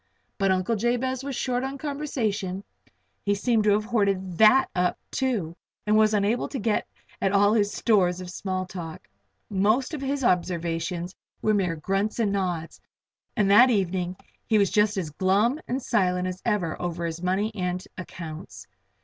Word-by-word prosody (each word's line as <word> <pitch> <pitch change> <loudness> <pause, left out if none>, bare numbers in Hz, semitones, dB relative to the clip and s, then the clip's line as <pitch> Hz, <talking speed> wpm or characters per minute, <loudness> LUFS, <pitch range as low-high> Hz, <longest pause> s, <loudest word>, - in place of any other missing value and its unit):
But 195 -1 +2
Uncle 185 +4 +1
Jabez 245 +4 -1
was 275 -1 -4
short 250 0 -1
on 270 +1 -4
conversation 225 -10 -3 0.6
he 205 0 +1
seemed 220 +1 +1
to - - +4
have 210 +1 +1
hoarded 195 -6 0
that 220 +5 +6
up, 180 0 +1
too, 220 -12 -1 0.3
and 210 0 +3
was 215 0 +4
unable 210 +4 +1
to 275 - -4
get 215 -2 0 0.3
at 195 +1 +1 0.2
his 205 -2 +2
stores 185 -6 +2
of 180 -1 -7
small 185 0 -3
talk. 175 -4 -8 0.4
Most 215 - +2
of 300 - -4
his 275 0 -2
observations 175 -2 -1 0.3
were 215 - +3
mere 185 -5 +1
grunts 195 +6 -1
and 220 -4 +1
nods, 180 -4 -3 0.6
and 205 -3 +3
that 240 +6 +8
evening 185 -4 0 0.3
he 220 - +3
was 200 -3 +3
just 210 -1 +2
as 165 -5 -3
glum 200 - +2
and 255 +2 -1
silent 180 -4 +1
as 185 +1 -5
ever 200 -8 -1
over 170 -1 -3
his 165 0 -4
money 190 +4 0
and 180 -2 -3
accounts. 170 -2 -8
200 Hz, 165 wpm, -26 LUFS, 180-225 Hz, 0.6 s, that